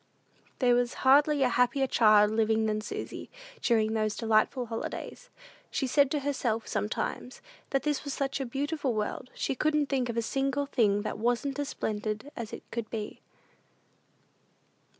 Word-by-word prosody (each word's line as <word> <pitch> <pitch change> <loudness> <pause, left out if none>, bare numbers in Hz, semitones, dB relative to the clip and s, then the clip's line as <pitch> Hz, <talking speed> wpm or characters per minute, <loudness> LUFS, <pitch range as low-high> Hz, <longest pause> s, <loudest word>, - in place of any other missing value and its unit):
There 245 -2 +4
was 245 0 +1
hardly 285 +1 +5
a 255 - +3
happier 250 +3 +2
child 215 -4 +5
living 220 0 +2
than 215 0 0
Susy, - - -6 0.3
during 220 -2 +2
those 215 -1 0
delightful 225 +3 +2
holidays. 230 - -6 0.4
She 270 - -1
said 280 +1 +3
to 295 0 -1
herself, 250 -5 -1
sometimes, 230 +3 -3 0.3
that 270 -2 0
this 295 -2 0
was 285 - -4
such 275 0 -2
a 270 - -2
beautiful 280 0 -2
world, 215 +4 -3
she - - -1
couldn't 300 +2 +1
think 260 -3 0
of 235 - -3
a 230 - +1
single 275 +3 0
thing 210 -7 +2
that 215 - -4
wasn't 245 +5 0
as 285 - -2
splendid 215 +5 -3
as 230 -2 -6
it - - -8
could 230 -2 -4
be. 215 -2 -5
245 Hz, 160 wpm, -29 LUFS, 220-275 Hz, 0.4 s, hardly